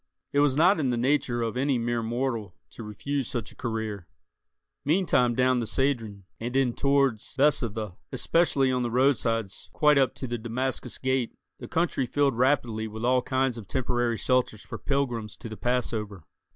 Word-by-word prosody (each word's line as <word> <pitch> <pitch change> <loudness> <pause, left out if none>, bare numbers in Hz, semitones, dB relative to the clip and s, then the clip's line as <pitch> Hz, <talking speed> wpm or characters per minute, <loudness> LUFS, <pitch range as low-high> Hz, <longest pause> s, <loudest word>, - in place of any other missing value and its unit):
It 145 - +3
was 145 -2 +3
not 180 +3 +5
in 135 -4 +1
the 120 - 0
nature 125 -2 +1
of 115 0 -2
any 135 +1 +1
mere 120 0 -1
mortal 115 -4 -2 0.2
to - - -10
refuse 125 +5 -3
such 120 -4 -4
a - - -16
career. 110 -6 -4 0.8
Meantime 145 -7 +2
down 130 0 +3
the 115 - -3
Cedron, 115 -8 -1 0.2
and 120 +3 -4
in 135 -3 +2
towards 140 -5 +1
Bezetha, 115 -9 +1
especially 140 -6 +2
on 125 -1 0
the 120 - -1
roadsides 115 -5 +1
quite 150 -2 +4
up 135 - +2
to - - -5
the 120 -1 -3
Damascus 125 +2 -3
Gate, 130 -2 -1 0.2
the - - -8
country 165 -6 0
filled 140 -1 +1
rapidly 120 -4 +1
with 110 +2 -5
all 125 +1 +3
kinds 130 -2 0
of 105 - -11
temporary 120 -2 0
shelters 125 -4 0
for - - -8
pilgrims 120 -6 -2
to 120 - -8
the 110 - -7
Passover. 110 -5 -2
125 Hz, 175 wpm, -27 LUFS, 115-135 Hz, 0.8 s, not